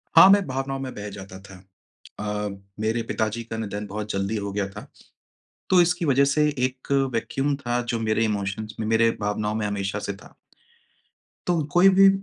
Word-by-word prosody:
हाँ, 190 - +10
मैं 200 0 +5
भावनाओं 135 +1 -3
में 130 -1 -5
बह 105 0 -6
जाता 95 -1 -9
था। 95 -1 -13 0.6
अ, 105 0 -2 0.3
मेरे 110 +2 0
पिताजी 110 +2 -1
का 115 0 -6
निधन 105 -1 -4
बहुत 105 +1 -5
जल्दी 100 +3 -1
हो 100 -1 -3
गया 100 -1 -1
था। - - -10 0.8
तो 185 -1 +6
इसकी 175 0 +1
वजह 140 -1 +4
से 150 +2 +3
एक 130 +1 -2 0.2
वैक्यूम 140 +5 -1
था 120 -3 -1
जो 120 -1 -2
मेरे 110 0 +1
इमोशंस 105 0 -3
में 110 - -2
मेरे 115 +1 +4
भावनाओं 105 +1 -1
में 110 - -1
हमेशा 100 0 -2
से 100 - -4
था। 100 - -16 1.1
तो 175 -2 +2
कोई 180 +5 +6
भी, 195 +1 +7
110 Hz, 180 wpm, -24 LUFS, 105-135 Hz, 1.1 s, हाँ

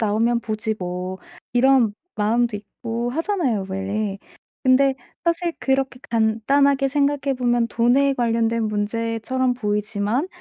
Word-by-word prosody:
나오면 225 +2 +2
보지 220 -1 -3
뭐.' 180 +1 -4 0.3
이런 250 -3 +4 0.2
마음도 225 +2 +1
있고 230 +3 -5
하잖아요, 305 - -1
원래. 195 +1 -2 0.4
근데 265 +1 +4 0.3
사실 340 0 +1
그렇게 265 -1 0
간단하게 270 +5 +2
생각해 280 0 +1
보면 240 -2 +1
돈에 260 +5 +3
관련된 230 -2 +1
문제처럼 230 +4 -1
보이지만 210 - -1
235 Hz, 275 characters per minute, -22 LUFS, 215-265 Hz, 0.4 s, 이런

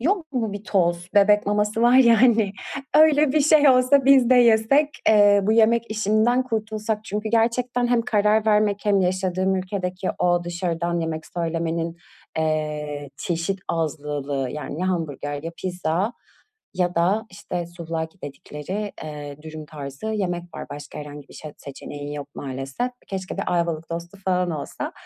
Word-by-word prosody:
yok 325 - -1
mu 225 -5 -1
bir 205 0 -7
toz? 175 -2 0
Bebek 205 +1 +5
maması 210 +2 0
var 245 +2 +6
ya, 235 -2 +6
hani. 220 -5 +4 0.4
Öyle 305 -2 +5
bir 305 - +3
şey 295 0 +5
olsa 255 +1 +5
biz 265 -3 +6
de - - +7
yesek. 245 +5 +5 0.2
Eee, 205 -1 +6
bu 215 +3 +2
yemek 230 0 +3
işinden 220 +4 +2
kurtulsak. 220 -2 -3
Çünkü 210 +1 -3
gerçekten 240 +2 +1
hem 240 -1 +2
karar 210 0 +2
vermek 210 -1 +3
hem 200 -2 +3
yaşadığım 185 +1 0
ülkedeki 185 0 -3
o 175 -1 +2
dışarıdan 170 -1 -2
yemek 160 -1 -4
söylemenin, 165 0 -2 0.4
eee, 150 -2 -2
çeşit 175 +3 -2
azlılığı, 145 -4 -2
yani, 150 +2 -6
ya 185 - 0
hamburger 145 -4 -3
ya 165 - -4
pizza 180 +3 -1 0.6
ya 180 -1 0
da, 200 +7 +2
işte, 185 - -9
σουβλάκι 170 0 -5
dedikleri, 150 +8 -6
eee, 145 -2 -7
dürüm 155 -1 -8
tarzı 145 +4 -8
yemek 185 -5 -1
var. - - -6
Başka 145 +1 -8
herhangi 145 -1 -9
bir - - -15
şey 155 - -8
yok, - - -23
seçeneğin 145 +1 -8
yok 145 -1 -5
maalesef. 135 - -4 0.2
Keşke 190 -1 -5
bir - - -1
Ayvalık 165 -2 -1
tostu 170 +3 -6
falan 180 -1 +1
olsa. 155 -3 -5
185 Hz, 155 wpm, -23 LUFS, 160-220 Hz, 0.6 s, de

